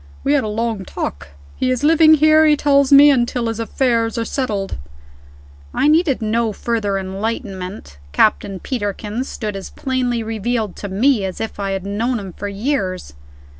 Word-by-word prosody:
We 280 Hz, -, +2 dB
had 285 Hz, -, +2 dB
a -, -, -3 dB
long 220 Hz, -1 st, -2 dB
talk. 70 Hz, -, -5 dB, 0.3 s
He 255 Hz, -, -1 dB
is 255 Hz, +1 st, -1 dB
living 315 Hz, 0 st, +6 dB
here, 310 Hz, +1 st, +5 dB
he 300 Hz, -1 st, +4 dB
tells 280 Hz, -1 st, +3 dB
me, 285 Hz, +1 st, +8 dB
until 240 Hz, -2 st, 0 dB
his 225 Hz, 0 st, -3 dB
affairs 230 Hz, -1 st, 0 dB
are 230 Hz, -, -1 dB
settled." 210 Hz, -7 st, -3 dB, 1.0 s
I -, -, +2 dB
needed 305 Hz, -6 st, +2 dB
no 225 Hz, 0 st, 0 dB
further 210 Hz, -3 st, -1 dB
enlightenment 190 Hz, -, -5 dB
Captain 195 Hz, -, +1 dB
Peterkin 210 Hz, +1 st, -3 dB
stood 215 Hz, -6 st, -5 dB
as 195 Hz, -, -7 dB
plainly 250 Hz, -3 st, -2 dB
revealed 225 Hz, -1 st, -2 dB
to 205 Hz, -, -6 dB
me 220 Hz, +3 st, +2 dB
as 190 Hz, -1 st, -4 dB
if 225 Hz, -2 st, -5 dB
I 200 Hz, -1 st, -2 dB
had 195 Hz, -1 st, -4 dB
known 225 Hz, +5 st, -1 dB
him 190 Hz, -3 st, -8 dB
for 205 Hz, -, -6 dB
years. 200 Hz, -, -3 dB
225 Hz, 170 wpm, -19 LUFS, 200-260 Hz, 1.0 s, me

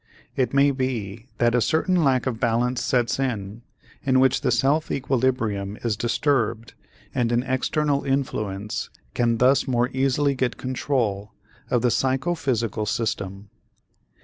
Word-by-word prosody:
It 130 Hz, -, +1 dB
may 140 Hz, +1 st, +4 dB
be 120 Hz, -4 st, -3 dB
that 120 Hz, -1 st, +2 dB
a 125 Hz, -, +3 dB
certain 170 Hz, -, +2 dB
lack 130 Hz, -3 st, +2 dB
of 120 Hz, -4 st, -2 dB
balance 120 Hz, +1 st, +1 dB
sets 120 Hz, -1 st, +1 dB
in 110 Hz, -5 st, -3 dB, 0.4 s
in 130 Hz, -1 st, +3 dB
which 130 Hz, -1 st, +3 dB
the 130 Hz, -, +1 dB
self 135 Hz, +6 st, +2 dB
equilibrium 120 Hz, -7 st, -1 dB
is 115 Hz, -3 st, 0 dB
disturbed 120 Hz, -1 st, 0 dB, 0.4 s
and 120 Hz, -3 st, 0 dB
an 120 Hz, +1 st, +2 dB
external 140 Hz, +2 st, 0 dB
influence 110 Hz, -7 st, -2 dB, 0.2 s
can 115 Hz, -1 st, +1 dB
thus 130 Hz, +4 st, +3 dB
more 125 Hz, -1 st, +1 dB
easily 135 Hz, +2 st, +1 dB
get 130 Hz, -2 st, -1 dB
control 120 Hz, -6 st, -2 dB, 0.4 s
of 125 Hz, -1 st, +1 dB
the 125 Hz, -, +3 dB
psychophysical 130 Hz, -, 0 dB
system. 100 Hz, -3 st, -3 dB
125 Hz, 135 wpm, -24 LUFS, 115-135 Hz, 0.4 s, may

